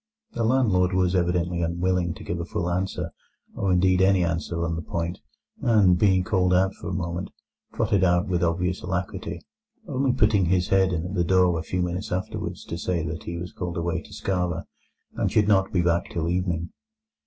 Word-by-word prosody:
The 115 - -2
landlord 110 -7 +3
was 90 -1 +2
evidently 90 -1 +1
unwilling 85 0 0
to - - -10
give 85 - -3
a - - -2
full 85 0 -2
answer, 95 +2 -2 0.4
or 100 - -1
indeed 90 +1 +3
any 95 -1 +4
answer, 85 0 -1
on 85 -1 -1
the 80 - -3
point, 85 +2 -3 0.4
and, 105 -6 +5
being 95 -1 +3
called 90 -1 +2
out 95 +1 +3
for - - -7
a - - -3
moment, 85 +1 -3 0.4
trotted 105 -4 +1
out 90 +2 +3
with 90 -2 0
obvious 90 +2 0
alacrity, 95 +1 -4 0.4
only 135 -3 +1
putting 105 -6 +3
his 90 +1 +1
head 95 -1 +3
in 85 -1 -2
at 90 - -5
the 90 -3 +1
door 90 -1 +3
a - - -2
few 90 +3 -2
minutes 90 +4 -3
afterwards 95 +1 -4
to 85 - -5
say 85 -3 -1
that 80 -1 -5
he 85 - -4
was 90 +1 -6
called 90 -2 -4
away 85 0 -1
to - - -16
Skara, 90 -3 -2 0.5
and - - 0
should 105 -1 +3
not 95 -2 +3
be 90 -2 +2
back 85 0 +1
till 85 -1 -2
evening. 85 -2 -1
90 Hz, 200 wpm, -25 LUFS, 85-95 Hz, 0.5 s, and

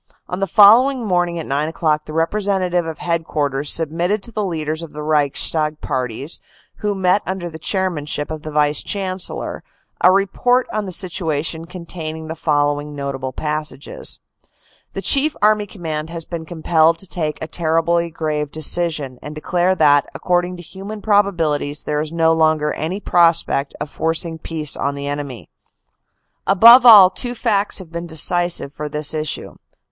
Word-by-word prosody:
On 180 - -5
the 195 - -1
following 235 +7 +5
morning 175 -3 0
at 165 - -5
nine 145 +3 -1
o - - -4
clock, 155 -2 0
the 155 - -9
representative 180 0 0
of 160 - -6
Head 170 -1 -2
quarters 145 -2 -2
submitted 170 +6 0
to 235 - -7
the 215 -1 -2
leaders 160 -3 -3
of 165 -3 -9
the 150 0 -6
Reichstag 150 +1 +1
parties, 130 +2 -3 0.4
who 210 -1 -2
met 190 +1 +2
under 180 -2 -4
the 160 - -10
chairmanship 160 -5 -1
of 155 -1 -5
the 155 - -7
Vice 150 -1 +2
Chancellor, 190 -2 -3 0.4
a 180 - +7
report 245 +6 +1
on 215 -2 -2
the - - -5
situation 165 -3 -2
containing 165 -2 -7
the 160 +1 -6
following 145 -1 -1
notable 135 -2 -4
passages: 150 0 -4 0.7
The - - -5
Chief 295 +2 +4
Army 210 0 +2
Command 160 -5 -5
has 165 -1 -5
been 165 -2 -6
compelled 165 -1 +2
to 195 - -6
take 155 -4 -3
a - - -4
terribly 170 +1 0
grave 155 -2 -3
decision, 155 -5 -1
and 150 +1 -8
declare 175 +4 0
that, 145 -4 +4
according 180 0 -1
to 175 - -10
human 200 +4 -9
probabilities, 165 -8 +1
there 150 0 -1
is 155 0 -5
no 165 -1 +2
longer 155 -2 +1
any 170 +6 -4
prospect 165 -7 +2
of 150 - -4
forcing 160 +2 -2
peace 155 -3 -3
on 140 0 -2
the 140 0 -6
enemy. 140 - -5 0.5
" - - -51
Above 235 +6 +8
all, 200 -5 +9
two 245 +2 -2
facts 205 -2 0
have 180 -4 -7
been 170 +1 -6
decisive 175 -2 +2
for 150 0 -6
this 150 +1 +2
issue. 155 -1 -4
165 Hz, 165 wpm, -19 LUFS, 150-185 Hz, 0.7 s, all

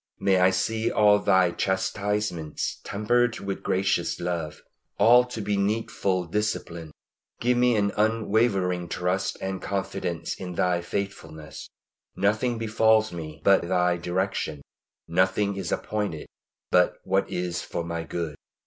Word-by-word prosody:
May 95 -1 +3
I 90 +1 +6
see 110 +5 0
all 105 -1 +5
Thy 95 -3 +3
chastisements 95 -3 -2
tempered 115 +3 +1
with 100 -1 -4
gracious 95 +1 0
love 85 -3 -4 0.3
all 125 +2 +6
to 125 -3 -6
be 100 0 -1
needful 100 -3 0
discipline. 85 -4 -3 0.5
Give 125 +1 +2
me 125 -1 +3
an 100 -1 +1
unwavering 105 -5 +1
trust 90 +3 -1
and 95 0 -3
confidence 95 -4 -3
in 90 -1 -7
Thy 90 0 +1
faithfulness. 80 -5 -6 0.5
Nothing 110 +4 +1
befalls 110 -1 +2
me 75 -3 -7
but 100 -1 +5
by 85 - -6
Thy 90 -1 +2
direction; 90 -4 -2 0.4
nothing 95 +3 +1
is 95 - -4
appointed 105 -8 -2 0.5
but 90 0 +4
what 95 +1 0
is 90 -1 -2
for 85 - -4
my 85 0 -4
good. 80 -1 -4
95 Hz, 130 wpm, -26 LUFS, 90-105 Hz, 0.5 s, I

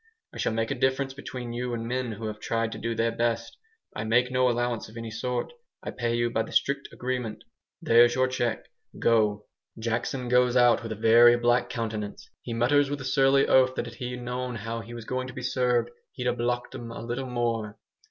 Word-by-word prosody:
I - - -9
shall - - +1
make 115 +2 -1
a - - +2
difference 130 +1 0
between 125 -3 -7
you 120 0 -2
and 115 0 -4
men 125 -1 -2
who 110 +2 -7
have 105 -1 -5
tried 115 +1 -1
to - - -6
do 115 0 -2
their 115 +1 +1
best. 115 0 -1 0.4
I 110 - -3
make 120 +3 +2
you - - -8
no 125 0 +3
allowance 120 -2 -1
of 110 - -12
any 115 -1 -6
sort, 125 - -3 0.3
I - - -4
pay 120 -1 -1
you 120 0 0
by 115 - +1
the 110 - -5
strict 140 0 0
agreement. 125 -4 -4 0.4
There's 120 +1 +6
your 130 0 +3
cheque. 120 -4 -2 0.3
Go!" 105 -2 +2 0.3
Jackson 120 +3 -2
goes 125 0 +3
out 120 -1 +5
with 115 -1 -6
a - - -7
very 115 +2 +6
black 120 0 +2
countenance. 110 -4 -4
He 120 - -7
mutters 135 +5 +3
with 145 0 -3
a - - -6
surly 135 0 +4
oath 130 0 +4
that - - -2
if - - -8
"he'd 125 -1 -5
known 125 0 -3
how 115 +1 -4
he 115 +2 -9
was 115 -2 -8
going 130 +1 -3
to 130 - -8
be 125 - -7
served 125 -2 +1 0.2
he'd 125 - -5
ha' 125 -1 +1
'blocked' 120 +1 -2
'em 115 - -7
a 115 - -7
little 120 +3 -3
more." 115 -3 -2
120 Hz, 220 wpm, -27 LUFS, 115-125 Hz, 0.4 s, There's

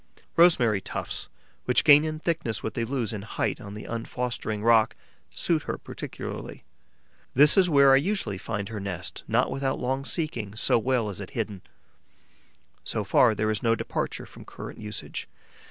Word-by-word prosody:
Rosemary 125 - +5
tufts, - - -4 0.4
which 125 -2 +3
gain 150 -1 +8
in 155 0 -2
thickness 155 -9 -2
what 110 - -3
they 115 - -1
lose 120 -3 -2
in 105 - -4
height 110 +4 -2
on 100 -2 -8
the 105 - -7
unfostering 115 -2 -3
rock, 115 -1 +4 0.4
suit 165 -3 +1
her - - -1
particularly. - - -7 0.7
This 145 +3 +7
is 185 -2 +5
where 140 -3 +6
I - - +7
usually 145 - -1
find 105 -1 -4
her 110 -2 -5
nest, 95 -3 -5
not - - +2
without 135 0 -1
long 135 +2 -1
seeking, 120 - -3
so 115 - +2
well 125 -1 +1
is 100 - -7
it 95 - -7
hidden. 105 -4 -3 1.2
So 110 - -2
far, 110 +3 +4
there 110 +1 0
is 105 - -1
no 115 -1 +3
departure - - -3
from - - -13
current - - -9
usage. 105 -1 -6
115 Hz, 170 wpm, -26 LUFS, 105-140 Hz, 1.2 s, gain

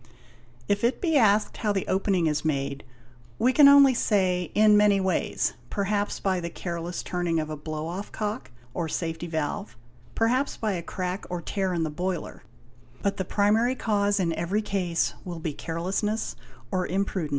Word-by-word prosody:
If 205 +1 0
it 240 +2 +2
be 325 -4 0
asked 215 -5 +3
how 210 - 0
the 195 -2 -1
opening 190 -2 +1
is 150 -2 0
made, 140 -2 -2 0.5
we 255 +2 +3
can 290 0 +8
only 280 -1 +8
say, 185 -7 +1
in 215 0 +6
many 205 -1 +5
ways: 190 -1 0 0.2
perhaps 205 0 -1
by 190 -2 0
the 170 -1 -4
careless 170 0 -5
turning 175 -2 -1
of 155 0 -3
a - - -3
blow 155 +1 -5
off 180 +5 -5
cock 215 +3 -4 0.2
or 165 -2 -2
safety 165 +1 -3
valve, 160 +5 -3 0.3
_ - - -26
perhaps 250 +5 +1
by 215 -2 -1
a 180 -3 -2
crack 185 +2 -4
or 180 - -3
tear 190 +2 -2
in 170 -2 0
the 155 - -2
boiler; 180 +2 -4 0.6
but 200 0 0
the 190 - -2
primary 215 +7 +2
cause 205 -4 +1
in 170 -3 +1
every 185 +7 -1
case 180 -5 0
will 175 -2 -6
be 160 -2 -3
carelessness 180 - -2 0.4
or 185 -1 0
imprudence. 190 -4 -1
190 Hz, 175 wpm, -26 LUFS, 170-210 Hz, 0.6 s, can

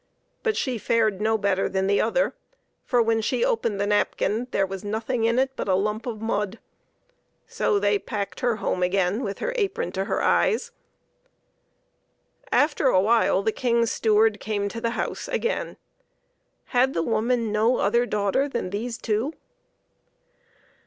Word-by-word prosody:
But 445 -2 0
she 250 -4 -1
fared 215 -3 +1
no 220 +1 +2
better 200 -2 0
than 190 0 0
the 200 +1 +2
other, - - +1 0.5
for, 245 -2 +2
when 225 0 +1
she 240 +2 0
opened 225 -3 0
the 200 - +1
napkin, 210 +2 0
there 195 - +1
was 195 +1 -7
nothing 225 +3 -1
in 230 +1 +2
it 265 +1 +2
but - - -4
a 190 - +3
lump 210 +4 -1
of 225 -3 -4
mud. 210 -1 -1 0.9
So 205 - 0
they 205 0 +2
packed 200 -1 -5
her 240 -2 +1
home 185 -3 -2
again 185 +4 +1
with 200 -1 -4
her - - -3
apron 400 -4 -1
to 190 0 -2
her - - -1
eyes. 475 +2 +2 1.8
After 295 -1 +3
a 185 - +4
while 210 -1 +3
the 220 - +1
King's 235 -1 +1
steward 220 -1 +2
came 205 -2 -2
to 230 +2 -6
the 230 0 -2
house - - -3
again. 470 - -2 1.0
Had 255 +2 +3
the 165 - +1
woman 230 +3 0
no 220 +4 +2
other 235 +4 +2
daughter 210 +7 0
than 235 -8 -3
these 225 +3 -3
two 225 +7 -1
220 Hz, 160 wpm, -24 LUFS, 200-240 Hz, 1.8 s, a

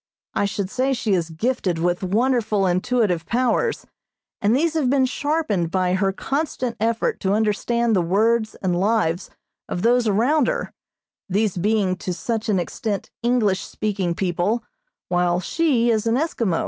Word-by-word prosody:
I - - +1
should 200 -1 -3
say 265 +1 +1
she 225 -5 0
is 170 -3 0
gifted 185 0 -1
with 175 +2 0
wonderful 215 0 +1
intuitive 185 -1 +1
powers, 255 - 0 0.6
and 210 +4 +3
these 320 +4 +1
have 300 -6 +1
been 270 0 +3
sharpened 260 - -1
by 185 0 +1
her 195 +1 +1
constant 260 +1 -2
effort 225 +1 0
to 190 0 0
understand 220 +2 +1
the 185 - +3
words 215 +5 +1
and 180 -2 +1
lives 195 -4 +1 0.4
of 175 - -3
those 240 0 +3
around 245 +7 +3
her, - - -2 0.6
these 205 +1 +1
being 195 0 +1
to 180 -1 -4
such 225 +4 -3
an 200 - +3
extent 200 +3 -3
English 225 -5 +2
speaking 195 -5 -2
people, 185 +6 0 0.5
while 175 0 +2
she 240 - +1
is 220 0 0
an 225 - +2
Eskimo. 235 - 0
215 Hz, 155 wpm, -22 LUFS, 185-240 Hz, 0.6 s, and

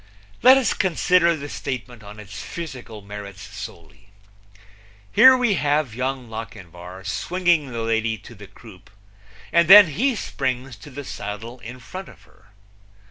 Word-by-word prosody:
Let 260 +2 +8
us 265 - +1
consider 180 -1 +2
the 145 -2 -7
statement 125 -4 -6
on 105 0 -12
its 100 -2 -9
physical 125 -10 -8
merits 100 0 -9
solely. 100 -2 -11 1.0
Here 260 - +7
we 245 -4 +2
have 145 - 0
Young 130 +1 -3
Lochinvar 95 -5 -9
swinging 175 -6 0
the 115 -1 -4
lady 115 0 0
to 110 +4 -14
the 105 -2 -13
croupe, 95 -5 -16 0.6
and 170 -1 +4
then 200 -1 +10
he 245 - 0
springs 130 - -3
to 110 - -13
the 145 +1 -8
saddle 110 +4 -7
in 120 +2 -10
front 185 +10 -9
of - - -17
her. 95 - -25
120 Hz, 145 wpm, -22 LUFS, 105-165 Hz, 1.0 s, then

